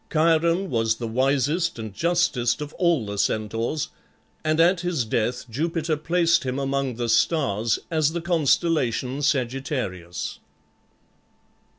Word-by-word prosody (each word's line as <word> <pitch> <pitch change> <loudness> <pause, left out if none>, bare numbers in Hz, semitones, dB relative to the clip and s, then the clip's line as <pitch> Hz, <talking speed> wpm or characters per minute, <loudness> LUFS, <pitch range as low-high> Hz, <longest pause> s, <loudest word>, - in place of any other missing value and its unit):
Chiron 165 +3 +2
was 115 -2 +1
the 115 0 -5
wisest 140 +8 +1
and 110 -3 -6
justest 160 - +1
of 150 0 -6
all 170 - +2
the 100 0 -5
Centaurs, 115 +9 -1 0.5
and 155 0 +1
at 175 +2 +4
his 170 -8 -1
death 120 +3 -1
Jupiter 160 +5 -1
placed 170 +2 +2
him 130 0 -2
among 135 -2 -1
the 120 0 -2
stars 115 -2 +2
as 155 -2 +2
the 170 - -2
constellation 145 -5 +1
Sagittarius. 125 - -2
140 Hz, 120 wpm, -24 LUFS, 115-165 Hz, 0.5 s, at